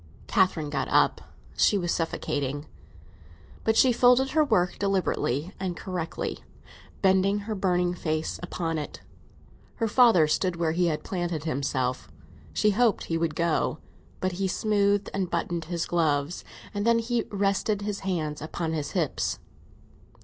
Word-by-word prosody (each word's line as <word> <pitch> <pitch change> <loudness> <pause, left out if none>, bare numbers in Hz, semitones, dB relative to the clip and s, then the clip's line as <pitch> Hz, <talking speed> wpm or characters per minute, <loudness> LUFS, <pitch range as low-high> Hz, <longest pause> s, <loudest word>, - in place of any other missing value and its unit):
Catherine 170 -6 +1
got - - -1
up; - - +3 0.3
she 205 - +4
was 175 -3 -1
suffocating. 145 -3 -2 1.0
But 220 0 +2
she 255 0 +6
folded 250 +2 +4
her 310 0 +4
work, 180 -11 +1
deliberately 185 -5 0
and 185 -2 -3
correctly, 175 -4 -4 0.6
bending 195 +2 +3
her 215 +2 -4
burning 180 -3 +1
face 155 -2 -2
upon 165 -2 -2
it. 150 - -7 0.7
Her 225 - 0
father 225 -8 +6
stood 175 +4 0
where 170 -2 0
he 175 +2 +1
had 155 -2 -1
planted 175 -5 -3
himself; 130 -4 -2 0.4
she 210 - +2
hoped 225 0 +2
he 165 - -1
would 165 -2 -1
go, 170 -2 +1 0.4
but 185 - 0
he 190 +2 -1
smoothed 205 0 +1
and 190 -2 -1
buttoned 170 -1 -2
his 170 0 -2
gloves, 155 -1 0 0.3
and 205 0 -2
then 235 +1 +4
he 230 0 0
rested 200 +1 0
his 205 -1 -3
hands 160 -6 -2
upon 160 +1 -3
his 150 -3 -3
hips. 165 -7 -1
180 Hz, 145 wpm, -27 LUFS, 160-200 Hz, 1.0 s, she